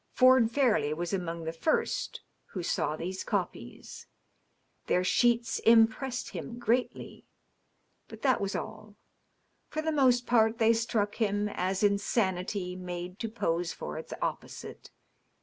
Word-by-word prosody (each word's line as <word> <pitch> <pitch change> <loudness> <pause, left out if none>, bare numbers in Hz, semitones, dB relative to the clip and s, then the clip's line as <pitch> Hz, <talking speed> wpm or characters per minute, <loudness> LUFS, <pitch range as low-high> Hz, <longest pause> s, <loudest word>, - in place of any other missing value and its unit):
Ford 255 -3 +6
Fairleigh 230 - +2
was 175 +2 -3
among 170 -3 -3
the 160 0 -4
first 240 - -1 0.2
who 185 -5 -6
saw 155 - 0
these 185 +4 -4
copies. - - -5 0.8
Their 180 - +2
sheets 235 +3 +2
impressed 230 +2 +3
him 240 - -7
greatly, 245 +1 -2 0.8
but - - -12
that 260 -3 +3
was 200 0 -2
all. 215 -1 -7 0.7
For 310 - -3
the 320 - 0
most 255 -4 +3
part 225 -1 +3
they 225 0 +4
struck 225 -2 -1
him 205 -1 +1
as 190 0 -2
insanity 195 -2 0
made 180 0 -6
to 225 - -3
pose 175 -6 -1
for 75 - -6
its - - -10
opposite. - - -6
215 Hz, 130 wpm, -29 LUFS, 180-235 Hz, 0.8 s, Ford